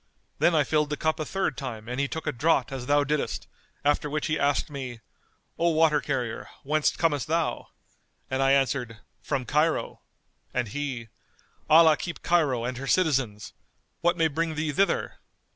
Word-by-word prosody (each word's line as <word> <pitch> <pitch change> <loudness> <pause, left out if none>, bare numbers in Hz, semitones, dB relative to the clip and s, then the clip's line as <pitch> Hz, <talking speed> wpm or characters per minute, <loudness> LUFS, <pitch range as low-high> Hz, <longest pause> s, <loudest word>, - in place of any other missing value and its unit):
Then 175 - +4
I 150 - +4
filled 150 +1 +1
the 150 - -2
cup 160 0 0
a 155 - -2
third 190 -6 -1
time 115 -6 -6
and 125 +2 -3
he 140 - +1
took 160 +3 -5
a - - 0
draught 135 -1 +1
as 130 -2 -5
thou 145 0 +4
diddest; 150 +1 -2 0.4
after 145 +1 +2
which 155 +1 -2
he 155 -2 0
asked 140 0 +1
me, 130 -4 -6 0.6
'O 170 +1 +3
water 155 -2 +3
carrier, 125 -5 -3
whence 150 +2 +1
comest 145 -7 0
thou?' 165 +1 -1 0.6
And 130 +1 -1
I 135 0 +4
answered, 130 -4 0 0.2
'From 135 -4 -2
Cairo,' 150 +6 0 0.5
and 120 - 0
he, 130 -3 -4 0.6
'Allah 160 -1 +7
keep 175 - -6
Cairo 145 -9 +2
and 125 0 -3
her 135 - -5
citizens! 135 - +1 0.5
What 175 +1 +2
may 165 -1 +3
bring 160 +1 -2
thee 155 0 -1
thither? 195 +7 0
145 Hz, 175 wpm, -26 LUFS, 130-160 Hz, 0.6 s, Allah